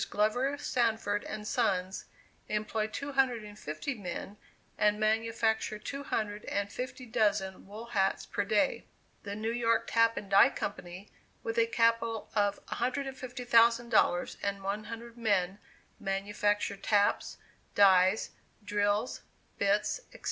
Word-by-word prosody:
Glover 245 Hz, +7 st, +1 dB
Sanford 225 Hz, -6 st, 0 dB
and 210 Hz, 0 st, -6 dB
Sons, 185 Hz, -2 st, 0 dB, 0.4 s
employ 215 Hz, +1 st, -1 dB
two 280 Hz, +6 st, -5 dB
hundred 260 Hz, -5 st, +2 dB
and 210 Hz, 0 st, -11 dB
fifty 155 Hz, -, -4 dB
men, 200 Hz, -1 st, -6 dB, 0.4 s
and 210 Hz, 0 st, +2 dB
manufacture 220 Hz, 0 st, +1 dB
two 275 Hz, +6 st, -6 dB
hundred 210 Hz, -6 st, -3 dB
and 200 Hz, 0 st, -2 dB
fifty 255 Hz, +2 st, -6 dB
dozen 205 Hz, -5 st, 0 dB
wool 215 Hz, +3 st, -8 dB
hats 200 Hz, -5 st, 0 dB
per 205 Hz, -, -2 dB
day. 215 Hz, +7 st, +1 dB, 0.3 s
The 200 Hz, -1 st, -5 dB
New 220 Hz, +2 st, -2 dB
York 230 Hz, -1 st, +2 dB
Tap 230 Hz, 0 st, +3 dB
and 200 Hz, -, -5 dB
Die 195 Hz, 0 st, +7 dB
Company, 185 Hz, 0 st, -6 dB, 0.3 s
with 225 Hz, +1 st, -1 dB
a 230 Hz, -, +4 dB
capital 230 Hz, -1 st, +1 dB
of 205 Hz, -1 st, 0 dB
$150,000, 240 Hz, -6 st, +2 dB
and 200 Hz, -1 st, -2 dB
one 205 Hz, +2 st, -2 dB
hundred 235 Hz, +1 st, -8 dB
men, 200 Hz, -3 st, +1 dB, 0.4 s
manufacture 205 Hz, +1 st, -1 dB
taps, 205 Hz, 0 st, +1 dB, 0.4 s
dies, 190 Hz, +1 st, +5 dB, 0.3 s
drills, 205 Hz, +2 st, 0 dB, 0.4 s
bits, 205 Hz, -, +1 dB
etc. -, -, -13 dB
215 Hz, 125 wpm, -31 LUFS, 200-230 Hz, 0.4 s, Die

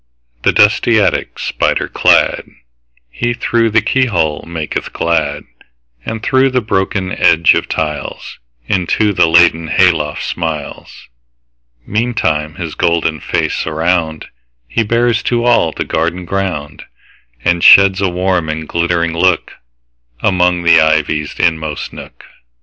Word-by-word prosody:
The -, -, +2 dB
dusty -, -, +3 dB
attic -, -, -1 dB
spider -, -, -1 dB
cladHe, -, -, -2 dB
through 115 Hz, -2 st, +1 dB
the 110 Hz, 0 st, +2 dB
keyhole, 100 Hz, -, 0 dB
maketh 80 Hz, -3 st, -5 dB
glad; 75 Hz, -3 st, -1 dB, 0.6 s
And 110 Hz, -1 st, -6 dB
through 130 Hz, +1 st, +2 dB
the 130 Hz, -1 st, 0 dB
broken 95 Hz, -3 st, -2 dB
edge 85 Hz, -1 st, +3 dB
of -, -, -2 dB
tiles, 75 Hz, -2 st, -5 dB, 0.3 s
Into 100 Hz, +3 st, 0 dB
the 85 Hz, -, +3 dB
laddered 85 Hz, -1 st, +3 dB
hay 90 Hz, 0 st, +4 dB
loft 75 Hz, -3 st, -4 dB
smiles. 80 Hz, -4 st, -6 dB, 0.8 s
Meantime 105 Hz, -9 st, -1 dB
his 85 Hz, -4 st, -6 dB
golden 85 Hz, -2 st, 0 dB
face -, -, -2 dB
aroundHe 80 Hz, 0 st, -2 dB, 0.6 s
bears 120 Hz, 0 st, +1 dB
to 120 Hz, -1 st, -1 dB
all 120 Hz, -9 st, +3 dB
the -, -, -5 dB
garden 85 Hz, +3 st, -2 dB
ground, 90 Hz, -6 st, -4 dB, 0.6 s
And 85 Hz, -1 st, +1 dB
sheds 100 Hz, 0 st, +6 dB
a 95 Hz, -, +1 dB
warm 90 Hz, -2 st, -1 dB
and 80 Hz, 0 st, -4 dB
glittering 85 Hz, -1 st, -1 dB
lookAmong 80 Hz, -, -2 dB
the 85 Hz, -1 st, +6 dB
ivy's 75 Hz, -1 st, 0 dB
inmost 80 Hz, -3 st, -2 dB
nook. -, -, -12 dB
85 Hz, 120 wpm, -14 LUFS, 80-95 Hz, 0.8 s, sheds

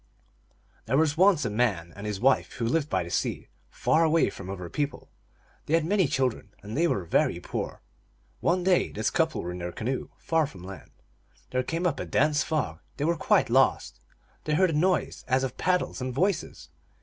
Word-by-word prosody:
There 130 Hz, +4 st, +2 dB
was 155 Hz, -1 st, +3 dB
once 175 Hz, -5 st, +4 dB
a -, -, 0 dB
man 100 Hz, -7 st, 0 dB
and 100 Hz, +2 st, -6 dB
his 105 Hz, -2 st, -3 dB
wife 130 Hz, +3 st, +2 dB
who 115 Hz, -, -3 dB
lived 150 Hz, +5 st, 0 dB
by 95 Hz, -7 st, 0 dB
the 85 Hz, -, -8 dB
sea, -, -, -2 dB, 0.2 s
far 160 Hz, -, +2 dB
away 160 Hz, 0 st, +3 dB
from 95 Hz, -1 st, -9 dB
other 90 Hz, -2 st, -5 dB
people. 145 Hz, -, -4 dB, 0.6 s
They 155 Hz, -, +3 dB
had 165 Hz, -1 st, +1 dB
many 190 Hz, -1 st, +2 dB
children, 125 Hz, -6 st, -1 dB
and 105 Hz, +2 st, -6 dB
they 170 Hz, +4 st, +3 dB
were 100 Hz, -, 0 dB
very 85 Hz, -, +1 dB
poor. -, -, -5 dB, 0.6 s
One 180 Hz, +1 st, +1 dB
day 180 Hz, -1 st, +2 dB
this 110 Hz, +1 st, -1 dB
couple 160 Hz, -2 st, 0 dB
were 90 Hz, -, -4 dB
in 90 Hz, -, -6 dB
their 90 Hz, 0 st, -4 dB
canoe, 125 Hz, +8 st, -3 dB
far 160 Hz, -2 st, +1 dB
from 95 Hz, -10 st, -12 dB
land. 95 Hz, 0 st, -10 dB, 0.6 s
There 130 Hz, -, +1 dB
came 165 Hz, +7 st, -3 dB
up 175 Hz, -, 0 dB
a -, -, -3 dB
dense 150 Hz, +2 st, +2 dB
fog; 135 Hz, -, -2 dB, 0.2 s
they 145 Hz, -, -1 dB
were 170 Hz, +1 st, +2 dB
quite -, -, +2 dB
lost. -, -, +2 dB, 0.5 s
They 150 Hz, -, +1 dB
heard 185 Hz, +1 st, +3 dB
a -, -, -3 dB
noise 180 Hz, +5 st, +1 dB
as 130 Hz, 0 st, +2 dB
of 130 Hz, -1 st, -3 dB
paddles 180 Hz, -6 st, 0 dB
and 130 Hz, 0 st, -2 dB
voices. 185 Hz, +8 st, -1 dB
135 Hz, 200 wpm, -27 LUFS, 105-165 Hz, 0.6 s, once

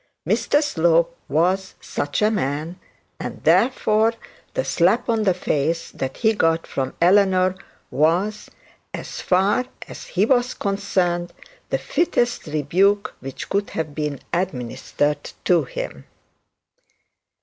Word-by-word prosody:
Mr 295 Hz, +2 st, +2 dB
Slope 170 Hz, -, +2 dB
was 185 Hz, +6 st, +1 dB
such 145 Hz, +8 st, -2 dB
a 215 Hz, -, +4 dB
man; 160 Hz, -2 st, -2 dB, 0.4 s
and, -, -, -6 dB
therefore, 225 Hz, -3 st, +3 dB, 0.4 s
the -, -, 0 dB
slap 190 Hz, +8 st, +2 dB
on 225 Hz, -2 st, +1 dB
that 190 Hz, -3 st, +3 dB
face 165 Hz, 0 st, -1 dB
that 135 Hz, 0 st, -4 dB
he 220 Hz, -1 st, +3 dB
got 165 Hz, -5 st, +1 dB
from 130 Hz, -1 st, -3 dB
Eleanor 185 Hz, 0 st, +4 dB, 0.4 s
was, 180 Hz, +8 st, +1 dB, 0.5 s
as -, -, -7 dB
far 195 Hz, +7 st, +2 dB, 0.2 s
as -, -, -9 dB
he 190 Hz, +3 st, +1 dB
was 250 Hz, 0 st, +2 dB
concerned, 185 Hz, -4 st, -1 dB, 0.4 s
the -, -, +1 dB
fittest 245 Hz, -, 0 dB
rebuke 185 Hz, +8 st, +1 dB
which 135 Hz, 0 st, -7 dB
could 200 Hz, +1 st, -1 dB
have 155 Hz, -2 st, -2 dB
been 150 Hz, -2 st, -3 dB
administered 145 Hz, -2 st, -1 dB, 0.2 s
to 170 Hz, -5 st, +4 dB
him. 70 Hz, -, -6 dB
180 Hz, 120 wpm, -22 LUFS, 155-205 Hz, 0.5 s, a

